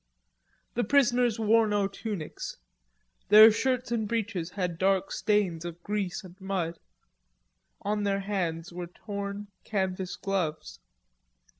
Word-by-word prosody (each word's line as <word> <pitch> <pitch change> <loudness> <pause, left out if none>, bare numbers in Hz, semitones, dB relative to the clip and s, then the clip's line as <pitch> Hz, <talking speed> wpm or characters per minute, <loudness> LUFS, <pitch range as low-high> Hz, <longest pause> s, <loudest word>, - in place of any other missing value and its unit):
The 240 - 0
prisoners 245 -4 +3
wore 225 0 +4
no 205 -1 +1
tunics; 200 -4 -6 0.7
their 215 +2 +10
shirts 250 +2 0
and 220 -3 0
breeches 210 -6 -2
had 180 -3 -3
dark 195 0 +2
stains 195 -6 +1
of 175 0 -7
grease 205 -1 -2
and 180 -1 -12
dirt; 185 -4 -2 1.0
on 210 +1 0
their 200 -1 0
hands 175 -4 -2
were 175 0 -5
torn 200 +2 -6
canvas 190 -3 -2
gloves. 160 - -3
200 Hz, 120 wpm, -28 LUFS, 180-215 Hz, 1.0 s, their